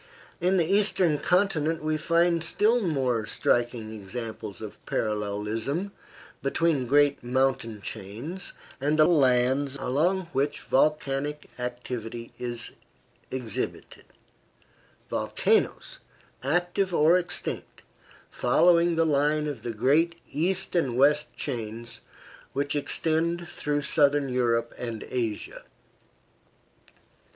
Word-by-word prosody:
In 185 +2 +2
the 170 - +3
Eastern 190 -4 +2
continent 165 -3 +1
we 155 0 0
find 170 +1 +2
still 220 +8 +2
more 130 - 0
striking 120 -2 0
examples 110 0 -7
of 110 -2 -9
parallelism 110 - -2 0.5
between 140 -2 +1
great 145 +1 +3
mountain 120 -4 0
chains 115 - -6 0.3
and 145 +3 +1
the 155 - +7
lands 135 -3 +3
along 155 +8 +1
which 140 +2 0
volcanic 150 0 0
activity 120 -1 -5
is 120 -1 -2 0.6
exhibited 125 -5 -4 1.0
volcanoes, - - 0 0.4
active 175 +5 0
or 160 +4 +5
extinct, 175 -1 -5 0.5
following 170 0 +4
the 165 0 +3
line 150 0 +2
of 145 -6 -4
the 120 - -5
great 145 +10 +2 0.2
east 185 +5 0
and 135 -8 +1
west 150 +3 +3
chains 115 -3 -5 0.5
which 140 +1 -1
extend 165 +3 0
through 145 -1 -2
southern 145 -2 +3
Europe 120 -2 +1
and 115 -3 -4
Asia. 115 -4 -3
140 Hz, 100 wpm, -27 LUFS, 120-165 Hz, 1.0 s, the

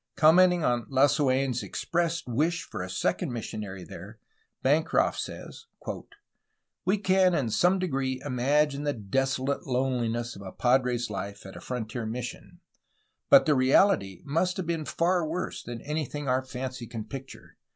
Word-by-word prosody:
Commenting 175 +2 +5
on 120 -4 +1
Lasuen' 135 -1 +3
s 120 0 -2
expressed 170 - -2
wish 155 +8 0
for - - -6
a 90 - -5
second 90 +4 -1
mis 120 -3 -4
sionary 95 -4 -6
there, - - -10 0.5
Bancroft 150 +4 +2
says: 455 - -7 1.2
"We 195 +3 +3
can 185 -2 +3
in 125 -8 0
some"degree 135 - +1
imagine'^the 140 -3 0
desolate 135 +1 0
loneliness 120 -2 -1
of 100 - -10
a 95 -1 -8
padre's 125 -2 +1
life 100 0 -6
at 95 - -10
a - - -9
frontier 120 -2 -4
mission; 125 +9 -6 0.7
but 275 -1 +8
the 155 - +4
reality 130 - +3
must 175 +6 0
have 185 - -2
been 165 -2 -2
far 170 +4 +1
worse 165 +4 -3
than 120 -1 -7
anything 150 -1 -3
our 130 +1 +1
fancy 130 -1 -6
can 115 -2 -5
picture. 135 +3 -10
130 Hz, 145 wpm, -28 LUFS, 120-160 Hz, 1.2 s, but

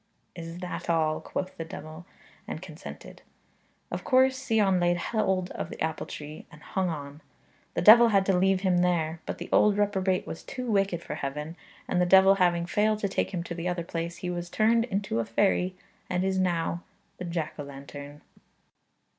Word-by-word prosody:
'Is 165 0 -7
that 180 -1 -5
all?' 155 -2 +1
quoth 185 0 -4
the 165 - -3
diawl, 160 +1 -9 0.4
and - - -5
consented. - - -10 0.7
Of - - -4
course 260 0 +3
Sion 205 -5 +3
laid 175 0 +2
hold 190 -2 0
of - - -5
the - - -9
apple 160 0 -2
tree, 150 +1 -8
and 150 - -14
hung 190 -2 -1
on. 145 -1 -6 0.5
The 170 - 0
devil 235 +4 +9
had 200 -3 +3
to 195 - +3
leave 190 +1 +3
him 185 -2 +2
there. 170 -2 +1
But - - -3
the - - -7
old 210 -1 +4
reprobate 190 -2 +1
was 160 - -7
too 255 -2 -6
wicked 195 -6 +1
for - - -5
heaven, 150 +4 -4 0.3
and 180 - +1
the 180 - +3
devil 190 +1 +7
having 175 -1 +3
failed 210 +4 +2
to 200 - +1
take - - -1
him 175 -3 -3
to 170 - -6
the 170 +1 -4
other 175 -1 -1
place, 170 +1 -4
he 180 0 -4
was 175 0 -4
turned 230 +3 +3
into 200 - -2
a - - +1
fairy, 180 - +1 0.3
and 180 0 0
is 190 0 +1
now 170 -2 0 0.4
the 180 - -4
jack 170 -3 -3
o' - - -3
lantern. 140 +1 -10
180 Hz, 190 wpm, -28 LUFS, 165-195 Hz, 0.7 s, devil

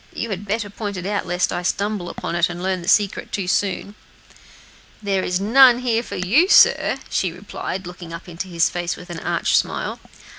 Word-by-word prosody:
You 230 - -4
had 200 +1 -5
better 205 0 -2
point 205 -2 -5
it 180 - -6
out, 200 -1 -2
lest 175 +1 0
I - - -2
should 175 - 0
stumble 200 -3 -3
upon - - -5
it 170 0 +2
and 175 0 -6
learn 185 -1 -1
the 170 - -10
secret 205 -1 +2
too 195 -3 -3
soon." 200 +2 -1 1.1
"There 195 -2 -1
is 180 0 -1
none 245 +4 +6
here 240 -2 0
for - - -8
you, 245 - +3
sir," - - +5
she 185 - 0
replied, 190 +1 -6
looking 175 -1 -9
up 165 +2 -8
into 175 +2 -6
his 170 -2 +2
face 175 -1 -3
with 180 0 -11
an 170 - -5
arch - - 0
smile. - - -1
190 Hz, 210 wpm, -21 LUFS, 175-205 Hz, 1.1 s, none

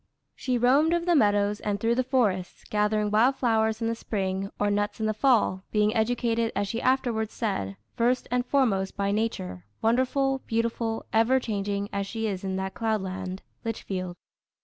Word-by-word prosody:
She 255 -2 -1
roamed 280 +8 +4
over 340 0 -1
the 350 - +3
meadows, 205 -4 +3
and 205 -1 -2
through 230 +2 +2
the 255 +2 +1
forests, 215 -9 0
gathering 210 0 +1
wild 235 +6 +4
flowers 220 -2 +1
in - - +1
the 230 - 0
spring 195 -3 -2
or 205 0 +2
nuts 205 +1 -1
in 220 - -1
the 215 - +1
fall, 215 -6 +2
being 210 0 +2
educated, 230 0 +1
as 200 0 0
she 230 +3 -3
afterwards 240 -4 0
said, 100 - -2 0.2
"first 245 +2 +1
and 250 0 +2
foremost 230 -9 +1
by 200 0 0
Nature, 95 - -2 0.2
wonderful, 260 +4 +1
beautiful, 230 0 -1
ever 230 +4 +4
changing 200 -3 -2
as 200 0 -2
she 225 +2 -3
is 195 -3 -3
in 190 -1 -2
that 190 0 -3
cloudland, 190 -4 -3 0.2
Litchfield. 185 -5 -4
220 Hz, 170 wpm, -27 LUFS, 200-240 Hz, 0.2 s, roamed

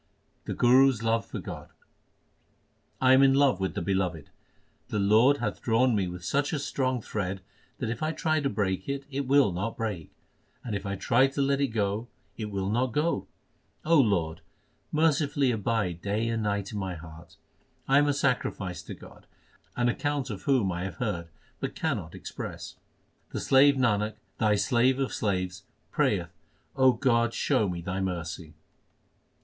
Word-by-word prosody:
The - - -4
Guru 130 +2 +6
s 115 -4 -3
love 115 0 +1
for - - -6
God: - - -7 1.3
I 130 0 +5
am 130 - +6
in 135 -1 +5
love 135 -8 +3
with 95 0 -2
the - - -2
Beloved. 90 -5 -2 0.6
The - - -3
Lord 110 +8 +4
hath - - -3
drawn 120 +1 +2
me 95 -3 0
with 90 0 -7
such 145 - 0
a - - +1
strong 130 -4 -1
thread 95 -2 -3 0.4
that 115 -3 -2
if 120 - -5
I 155 0 0
try 155 -1 0
to 140 -2 0
break 95 -1 -2
it, 140 0 -3
it 140 0 -3
will 140 -5 +4
not 95 +6 -3
break; 105 -8 -4 0.5
and 110 -4 -3
if 100 0 -4
I 100 - -2
try 120 +7 +3
to 135 +1 -3
let 140 0 +1
it 140 - +3
go, 110 0 -1 0.3
it 105 0 -5
will 100 -1 -2
not 120 +2 0
go. 155 +5 0 0.6
Lord, 100 - +2 0.5
mercifully 150 -3 +2
abide 105 -6 -1
day 105 +3 -1
and 115 -1 -1
night 100 -2 -2
in 105 - -4
my 95 -2 -3
heart. 80 0 -12 0.5
1 135 +1 +5
am 145 - +3
a 145 - +2
sacrifice 115 -9 -1
to - - -8
God, - - -15 0.5
an 120 0 +1
account 145 +1 -1
of 100 - -6
whom 125 -9 +2
I 90 +1 -3
have 95 -3 -6
heard, 90 -7 -3 0.3
but - - -4
cannot - - -3
express. - - -7 0.6
The - - -4
slave 140 +1 +5
Nanak, 110 -4 +1 0.2
Thy 105 -1 +3
slave 120 +6 +2
of 135 -1 -2
slaves, 95 -3 -2 0.3
prayeth - - 0 0.4
O 130 -1 +5
God, 120 -2 +1
show 105 - +1
me 85 -1 -4
Thy 95 +2 -3
mercy 85 -3 -4
115 Hz, 175 wpm, -28 LUFS, 95-135 Hz, 1.3 s, Guru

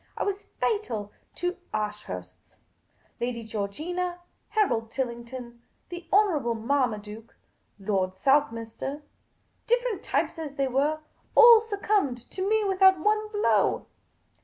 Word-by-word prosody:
I - - -1
was 405 0 -3
fatal 235 - -1 0.2
to 355 +1 -2
Ashursts. 90 - -6 0.6
Lady 240 -1 -3
Georginn, 310 - -3 0.3
Harold 235 - +1
Tillington, 240 -1 -5 0.3
the 345 -1 -8
Honourable 320 - +3
Marmaduke, 225 -3 -2 0.4
Lord 190 -2 -1
South 275 +5 +3
minster— 230 +6 -6 0.6
different 485 -2 +1
types - - -1
as 295 -3 -6
they 275 -1 +1
were 290 +4 0 0.2
— - - -38
all 470 -1 +10
succumbed 400 - -1
to 380 +1 -2
me 435 0 +3
without 380 -1 +5
one 425 +4 +1
blow. 415 0 +2
280 Hz, 115 wpm, -27 LUFS, -, 0.6 s, all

